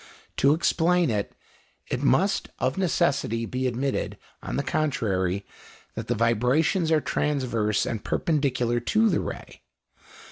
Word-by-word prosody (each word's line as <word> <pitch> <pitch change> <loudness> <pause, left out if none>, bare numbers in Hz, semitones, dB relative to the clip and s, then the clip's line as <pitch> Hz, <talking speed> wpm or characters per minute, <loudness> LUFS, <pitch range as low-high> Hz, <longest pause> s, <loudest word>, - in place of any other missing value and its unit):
To 140 +2 +4
explain 170 -1 +2
it, 105 -2 -2 0.6
it - - -1
must - - +2
of 130 +2 0
necessity 140 - 0
be 130 +3 -2
admitted, 130 +3 -2 0.2
on - - -5
the - - 0
contrary, 100 -10 -1 0.5
that 115 0 -6
the 120 - 0
vibrations 125 - +2
are 160 - +5
transverse 125 -9 0
and 110 -3 -4
perpendicular 130 -6 0
to 220 - +2
the 175 - +1
ray. - - -7
130 Hz, 130 wpm, -25 LUFS, 115-155 Hz, 0.6 s, are